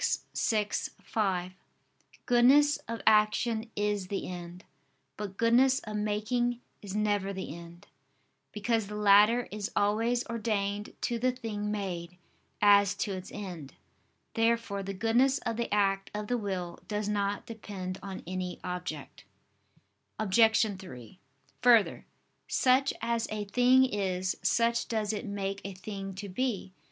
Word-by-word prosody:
vi, 215 -2 +1 0.4
5), 185 -4 -1 0.7
"goodness 275 +4 +5
of 230 0 -5
action 220 +1 +3
is 205 -2 -1
the 195 +1 -3
end, 180 0 -8 0.5
but 200 -2 -6
goodness 250 +3 +4
of 215 -1 -6
making 215 +4 0 0.2
is 200 -1 -7
never 205 -2 0
the 190 -5 -5
end": 170 0 -12 0.7
because 220 0 0
the 210 - -6
latter 210 +3 +5
is 210 +1 -4
always 225 +4 +1
ordained 210 -3 -2
to 235 -1 -1
the 255 +2 +2
thing 220 -4 -4
made, 180 -4 -4 0.5
as 200 -1 +6
to 205 - -2
its 185 -1 -6
end. 175 -9 -7 0.6
Therefore 225 -3 +1
the 195 0 -5
goodness 240 +7 +3
of 230 - -1
the 235 +1 -3
act 195 -1 +1
of 210 0 -3
the 245 +3 0
will 185 -4 -4
does 210 -1 -2
not 205 -1 -1
depend 195 -5 -6
on 195 -1 -7
any 180 0 -4
object. 180 -5 -6 0.9
Obj. 220 +2 +4
3: 130 - -11 0.4
Further, 235 -4 +4 0.4
such 260 +2 +3
as 230 0 0
a 215 -1 -3
thing 250 +5 +5
is, 190 -5 -1
such 230 +4 +2
does 220 -2 -1
it 215 +2 -4
make 195 -1 -3
a 195 -1 -6
thing 195 0 -6
to 200 +2 -6
be. 200 -2 -2
210 Hz, 135 wpm, -30 LUFS, 195-230 Hz, 0.9 s, as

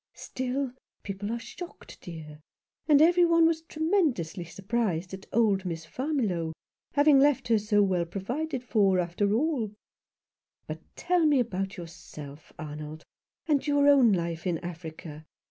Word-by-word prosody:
" - - -66
Still, 260 0 -3 0.3
people 200 +2 -4
are 235 - -1
shocked, 345 +8 -10
dear. 155 -3 -9 0.5
And 295 -3 +6
even* 350 +1 +5
one 335 -1 +5
was 325 -1 +2
tremendously 315 - 0
surprised 195 -2 -2
at 190 0 -8
old 205 -4 +3
Miss 165 -3 -4
Farmiloe 215 - -1 0.4
having 290 -1 +6
left 280 -3 +3
her 225 -2 +4
so 210 0 +3
well 180 -3 +1
provided 250 - -3
for, 200 -6 +3
after 180 +3 0
alL 275 -6 0 1.0
But - - -6 0.2
tell 350 -3 +2
me 290 -3 +4
about 195 -3 -2
yourself, 160 -4 -10
Arnold, 150 0 -7 0.4
and 300 -3 +1
your 285 0 +4
own 270 -6 +6
life 170 -1 -1
in 175 -2 +1
Africa. 160 -2 -8
205 Hz, 145 wpm, -28 LUFS, 170-285 Hz, 1.0 s, And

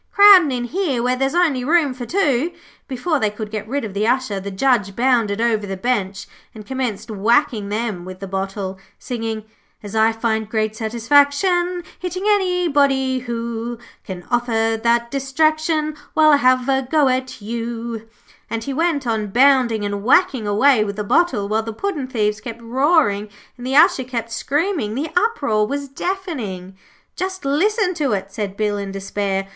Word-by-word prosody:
'Crowding 400 -7 +8
in 245 -1 -2
here 275 -3 -1
where 250 +1 +1
there's 270 +4 -1
only 310 -8 +2
room 300 -1 +2
for 245 -2 -7
two.' 320 -4 +1 0.4
Before 280 +4 -1
they 215 - +1
could 210 0 -7
get 215 -1 -5
rid 275 +1 -2
of 205 - -7
the 205 +2 0
Usher, 245 -5 0
the 195 +1 -6
Judge 205 -1 +1
bounded 235 -4 +1
over 220 -3 +1
the 195 0 -4
bench 195 -4 -2 0.3
and 215 -1 -10
commenced 245 -3 -4
whacking 220 +1 +1
them 210 -4 -3
with 185 0 -9
the 195 - -6
bottle, 195 0 -4 0.2
singing 225 -3 -4 0.4
'As 205 +1 -7
I 220 +1 +4
find 220 -1 -2
great 215 -1 -1
satisfaction 285 - +2 0.2
Hitting 365 +1 -4
anybody 290 -10 +2
who 235 -1 -4 0.3
Can 185 -3 -8
offer 225 -2 +1
that 235 0 +2
distraction, 310 +3 0 0.2
Why, 310 -1 +6
I'll 290 - +6
have 255 -1 +3
a 265 -1 +2
go 300 -2 +3
at 255 0 -1
you,' 230 +1 -5 0.4
and 225 0 -3
he 275 - -4
went 320 -2 0
on 220 -3 -1
bounding 245 -2 +3
and 205 0 -3
whacking 260 - +3
away 215 +3 +4
with 200 -1 -4
the 210 - -3
bottle, 220 -4 +1
while 215 +2 0
the 225 0 -6
puddin' 300 - -3
thieves 215 -4 -1
kept 230 0 -7
roaring, 240 -5 +2 0.3
and 245 0 -8
the 265 - -1
Usher 335 -3 +5
kept 235 -2 -5
screaming. 290 - -1
The 300 +5 -3
uproar 285 - +1
was 280 +3 -3
deafening. 265 - -5 0.4
'Just 375 -1 -4
listen 370 +7 +1
to 295 -9 -1
it,' 195 0 -3
said 200 -2 -4
Bill, 210 -1 -1
in 200 -1 -5
despair. 195 0 -3
240 Hz, 170 wpm, -20 LUFS, 215-285 Hz, 0.4 s, Crowding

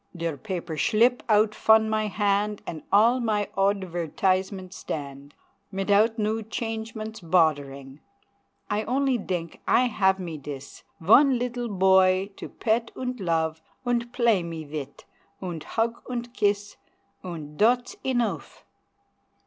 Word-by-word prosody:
Der 165 -2 -2
paper 175 -2 -5
schlip 240 +7 +3
out 210 0 +4
fon 220 0 +4
my 215 0 0
hand, 205 0 0
And 160 -2 -6
all 230 +5 +5
my 215 -4 0
odvairtizement 190 0 0
stand, 140 -3 -7 0.4
Mitout 205 +4 +2
new 220 +1 0
changements 220 0 -5
boddering; 145 -5 0 0.7
I 210 +1 0
only 265 -1 +1
dink 175 -4 -4
I - - +5
have 190 -5 +2
me 165 -4 -5
dis 140 -1 -9 0.2
Von 255 - +6
leedle 245 0 -3
boy 190 0 +4
to - - -7
pet 230 0 0
unt 250 -1 -4
love 160 -3 -1 0.2
Unt 240 -1 0
play 235 -6 +3
me 165 -2 -6
vit, 145 -2 -7 0.3
unt 175 -5 -6
hug 230 +1 0
unt 240 -1 -4
kiss 205 -2 0 0.5
Unt 155 -5 -7
dot's 245 +3 +3
enough! 245 -3 -2
205 Hz, 125 wpm, -26 LUFS, 170-225 Hz, 0.7 s, Von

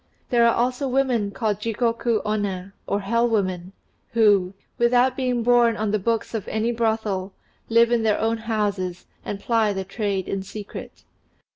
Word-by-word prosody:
There 235 -1 +5
are 230 - +3
also 250 +3 0
women 250 -5 +1
called 210 -1 -2
Jigoku 230 +1 0
Omna, 200 -3 -2
or 200 - 0
hell 230 +4 +1
women, 185 -4 -1 0.4
who, 200 -5 +3 0.2
without 245 +2 +3
being 250 -3 0
borne 240 -1 +4
on 215 -1 -1
the 215 - +1
books 230 +4 -1
of 220 -4 -3
any 220 +2 0
brothel, 220 -5 -1 0.4
live 230 +1 +4
in 240 -1 +3
their 220 -2 +2
own 225 +1 +1
houses, 205 -5 -2 0.2
and 200 - -5
ply 220 -1 +1
their 190 -1 -4
trade 195 -1 -2
in 195 - -2
secret. 205 +2 -9
220 Hz, 160 wpm, -23 LUFS, 200-235 Hz, 0.4 s, There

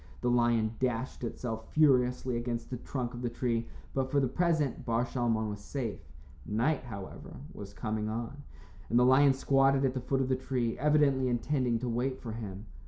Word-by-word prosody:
The 125 - +1
lion 120 -2 +2
dashed 125 0 -2
itself 115 -1 -4
furiously 125 -4 +3
against 120 0 -3
the 125 - -2
trunk 125 0 -4
of 120 - -6
the 120 - -1
tree, 115 -1 -1 0.3
but, 135 -1 0
for 140 - +2
the 135 - +2
present, 160 -1 0
Bar 115 +1 +1
Shalmon 115 -3 0
was 105 - -6
safe. 115 +1 -4 0.4
Night, 120 +8 +1
however, 100 -6 -8 0.2
was 100 -1 -8
coming 110 0 -3
on, 120 +6 -4 0.5
and 120 - +3
the 125 - +6
lion 135 +2 +6
squatted 135 0 +3
at 130 - +1
the 130 - -3
foot 135 +2 0
of 130 - 0
the 130 - +3
tree, 125 -3 -1
evidently 145 -2 +3
intending 125 0 +1
to 125 +2 -4
wait 125 +3 -1
for 115 - -6
him. 105 -2 -6
125 Hz, 185 wpm, -31 LUFS, 115-135 Hz, 0.5 s, the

